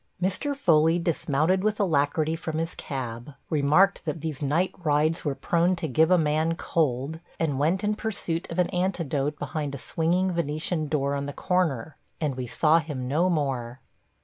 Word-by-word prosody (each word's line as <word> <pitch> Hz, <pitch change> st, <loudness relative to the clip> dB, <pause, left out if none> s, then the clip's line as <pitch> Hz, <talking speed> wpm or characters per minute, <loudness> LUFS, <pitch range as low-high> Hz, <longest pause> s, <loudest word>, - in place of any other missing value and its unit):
Mr. 195 Hz, +11 st, 0 dB
Foley 165 Hz, -, +4 dB
dismounted 170 Hz, +2 st, +1 dB
with 215 Hz, 0 st, 0 dB
alacrity 155 Hz, -3 st, +1 dB
from 160 Hz, -1 st, -4 dB
his 165 Hz, +1 st, -2 dB
cab, 125 Hz, 0 st, -6 dB, 0.2 s
remarked 155 Hz, +6 st, +3 dB
that 160 Hz, -1 st, -3 dB
these 155 Hz, -2 st, -5 dB
night 155 Hz, +6 st, +1 dB
rides 155 Hz, +1 st, +2 dB
were 145 Hz, -3 st, -1 dB
prone 170 Hz, +6 st, +1 dB
to 165 Hz, -2 st, -3 dB
give 155 Hz, +4 st, +3 dB
a 180 Hz, -, +5 dB
man 155 Hz, +1 st, +1 dB
cold, 150 Hz, -1 st, -1 dB, 0.2 s
and 145 Hz, -5 st, 0 dB
went 170 Hz, +7 st, +1 dB
in 210 Hz, +1 st, +1 dB
pursuit 200 Hz, -6 st, -3 dB
of 165 Hz, -, -5 dB
an 180 Hz, -1 st, +3 dB
antidote 160 Hz, -6 st, -1 dB
behind 145 Hz, -3 st, -3 dB
a -, -, -5 dB
swinging 175 Hz, +7 st, 0 dB
Venetian 155 Hz, -1 st, -2 dB
door 140 Hz, -2 st, 0 dB
on 140 Hz, 0 st, -2 dB
the 145 Hz, -, -5 dB
corner, 160 Hz, -7 st, -1 dB, 0.2 s
and 150 Hz, -4 st, 0 dB
we 125 Hz, -1 st, -5 dB
saw 155 Hz, +6 st, +4 dB
him 145 Hz, -6 st, -5 dB
no 165 Hz, +7 st, +2 dB
more. 130 Hz, -7 st, -1 dB
155 Hz, 175 wpm, -26 LUFS, 145-175 Hz, 0.2 s, a